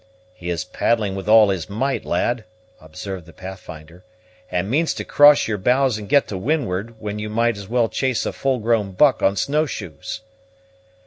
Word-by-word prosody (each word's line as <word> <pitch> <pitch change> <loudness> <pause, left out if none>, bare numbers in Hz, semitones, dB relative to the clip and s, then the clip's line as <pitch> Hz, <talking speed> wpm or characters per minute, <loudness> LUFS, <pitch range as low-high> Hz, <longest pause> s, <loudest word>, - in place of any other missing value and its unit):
"He 90 -5 -7
is 85 -2 -2
paddling 110 -4 0
with 95 +2 -5
all 110 -1 +7
his 95 -3 -2
might, 130 +7 -2
lad," 120 -2 -1 0.3
observed 85 +3 -8
the 85 - -14
Pathfinder, 90 -3 -10 0.5
"and 90 +1 -1
means 155 +8 +1
to - - -5
cross 145 0 +6
your 105 -2 -2
bows 125 +2 +2
and 105 - -9
get 140 0 +4
to 95 - -4
windward, 115 -4 -2
when 105 -1 -5
you 105 0 -4
might 115 +2 +1
as 100 -1 -9
well 120 -1 +2
chase 130 +1 -1
a - - -2
full 135 -1 0
grown 110 -4 0
buck 130 +3 +4
on 100 - +3
snow 150 +10 0
shoes!" 90 - -7
105 Hz, 185 wpm, -21 LUFS, 95-125 Hz, 0.5 s, all